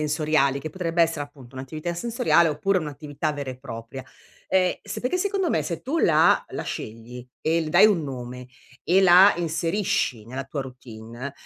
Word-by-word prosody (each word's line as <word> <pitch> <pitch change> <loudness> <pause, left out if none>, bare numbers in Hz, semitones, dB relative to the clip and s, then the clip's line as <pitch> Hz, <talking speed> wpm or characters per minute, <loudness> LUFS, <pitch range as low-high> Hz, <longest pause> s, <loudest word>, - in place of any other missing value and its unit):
sensoriali 150 -2 +1
che 155 - -5
potrebbe 170 0 -2
essere 165 -3 +2
appunto 135 -3 -16
un'attività 155 +6 -5
sensoriale 225 -3 +2
oppure 185 +7 0
un'attività 150 -1 -4
vera 140 -2 -6
e 130 - -5
propria. 125 0 -8 0.4
Ehm, 185 -1 +2
sapete 250 +9 -3
secondo 385 -1 0
me - - +1
se 170 -3 -4
tu 290 +6 -2
la 160 0 +4
la - - -5
scegli 115 +3 -7
e 165 +1 +1
le 155 - -5
dai 210 - +7
un 190 -7 +2
nome 125 -2 -7 0.4
e 185 +3 +4
la 190 +2 +7
inserisci 165 - -1
nella 130 +3 -5
tua 140 +2 -5
routine 125 0 -9
155 Hz, 170 wpm, -24 LUFS, 130-175 Hz, 0.4 s, dai